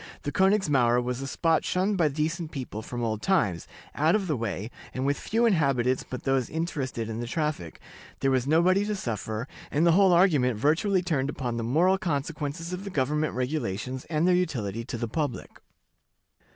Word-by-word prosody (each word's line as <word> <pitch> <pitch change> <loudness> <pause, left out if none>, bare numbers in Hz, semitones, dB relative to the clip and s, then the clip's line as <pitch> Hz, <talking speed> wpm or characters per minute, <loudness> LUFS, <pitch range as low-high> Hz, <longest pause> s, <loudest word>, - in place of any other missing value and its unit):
The 145 - -2
Königsmauer 145 - +3
was 125 +1 -3
a 135 - -4
spot 160 +4 +1
shunned 190 +3 0
by 170 -5 +3
decent 155 +3 -2
people 130 -8 -6
from 120 +2 -5
old 110 -2 -1
times, 105 - +1 0.3
out 155 +5 +3
of 210 -2 0
the 155 -5 0
way, 110 -1 -4 0.2
and 130 +1 -1
with 140 +1 +2
few 230 +9 0
inhabitants 135 - +2
but 125 - -7
those 135 -3 +1
interested 145 -8 -3
in 115 0 -4
the 120 - -4
traffic, 150 - -3 0.4
there 135 - +1
was 130 0 +1
nobody 180 +6 +4
to 210 0 -1
suffer, 110 - -4 0.2
and 155 +4 +2
the 170 - +6
whole 190 +2 +5
argument 150 - +4
virtually 175 - +2
turned 145 -6 0
upon 125 -5 -3
the 115 - -2
moral 175 +11 +3
consequences 160 0 -3
of 180 +2 -5
the 200 - -5
government 150 -1 0
regulations 130 -2 -3
and 160 +1 0
their 180 - +5
utility 115 - -1
to 120 - -5
the 115 - -2
public. 145 +1 -4
145 Hz, 185 wpm, -27 LUFS, 125-170 Hz, 0.4 s, the